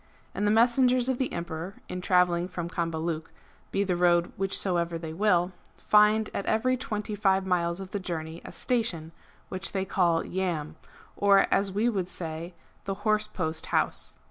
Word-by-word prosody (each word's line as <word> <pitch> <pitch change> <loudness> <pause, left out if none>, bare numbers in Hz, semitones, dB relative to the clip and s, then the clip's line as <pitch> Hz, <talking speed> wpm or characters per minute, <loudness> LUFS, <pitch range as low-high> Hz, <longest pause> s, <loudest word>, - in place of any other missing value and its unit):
^ - - -33 0.3
And 205 - 0
the - - +4
messengers 245 +2 +4
of 260 - 0
the 260 - -1
Emperor 170 +2 -5
in 180 - -5
travelling 180 -1 +3
from 175 -2 -5
Cambaluc, 165 -1 -2 0.4
be 200 - +1
the 185 -3 0
road 175 0 +3
whichsoever 175 -3 0
they 160 -1 -6
will, 180 -1 +2 0.3
find 210 +1 +4
at 200 - -3
every 255 +4 +2
twenty 215 -4 -4
five 195 -2 +2
miles 175 -1 0
of 190 0 -8
the 205 - -2
journey 165 -2 -5
a - - -9
station 205 -10 -1 0.4
which 185 0 -4
they 190 -1 -1
call 175 -4 +2
Yamb^ 170 -5 -2 0.4
or, 200 -1 +5
as 195 0 +2
we 205 +4 0
should 195 -7 0
say, 165 +1 -6 0.3
the 195 - -1
" 200 +1 -13
Horse 215 0 +2
Post 160 -6 -3
House." - - 0
185 Hz, 175 wpm, -28 LUFS, 170-210 Hz, 0.4 s, or